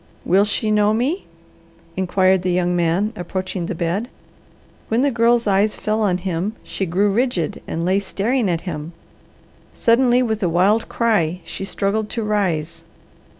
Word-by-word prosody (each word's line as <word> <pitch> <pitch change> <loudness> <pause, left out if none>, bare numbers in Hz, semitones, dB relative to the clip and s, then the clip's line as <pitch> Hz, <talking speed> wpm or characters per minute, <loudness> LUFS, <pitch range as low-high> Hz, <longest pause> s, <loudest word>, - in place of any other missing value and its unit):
"Will 195 +3 +4
she 215 +1 -1
know 210 0 +3
me?" 275 - -1 0.7
inquired 190 0 +2
the 180 0 0
young 175 0 +1
man, 175 +6 +1
approaching 185 -1 -4
the - - -3
bed. 175 +9 -2 0.8
When 225 +2 +1
the 285 - +2
Girl's 235 0 +3
eyes 205 +1 +2
fell 215 +1 -1
on 190 -4 +2
him 185 +3 -3
she 190 - -3
grew 195 +5 +2
rigid 220 - -1
and 165 +1 -3
lay 190 +2 +2
staring 210 +3 -1
at 170 -1 -1
him. 160 -2 -6 0.8
Suddenly 245 +1 +3
with 220 -2 -2
a 180 - +1
wild 195 +7 +2
cry 185 -7 +1
she - - -6
struggled 210 +2 -1
to 230 - -3
rise. 185 -7 -1
195 Hz, 155 wpm, -20 LUFS, 180-220 Hz, 0.8 s, Will